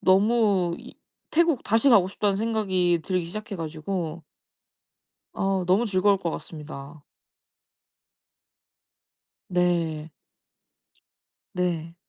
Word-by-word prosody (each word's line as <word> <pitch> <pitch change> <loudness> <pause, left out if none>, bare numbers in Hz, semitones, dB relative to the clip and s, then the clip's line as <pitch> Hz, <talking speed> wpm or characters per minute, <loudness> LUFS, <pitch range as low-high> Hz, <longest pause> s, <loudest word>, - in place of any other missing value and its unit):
너무 195 -3 +3
이 - - -12 0.4
'태국 330 -4 +2
다시 225 +5 +3
가고 200 -7 +6
싶다.'는 200 0 0
생각이 190 -6 +1
들기 185 -2 0
시작해 210 +4 -6
가지고 165 0 -4 1.1
아 195 -1 0
너무 195 +6 +3
즐거울 195 0 +3
것 175 -3 -2
같습니다. 150 -2 -8 2.4
네. 170 -3 0 1.4
네. 170 -2 -2
185 Hz, 180 characters per minute, -25 LUFS, 165-205 Hz, 2.4 s, 가고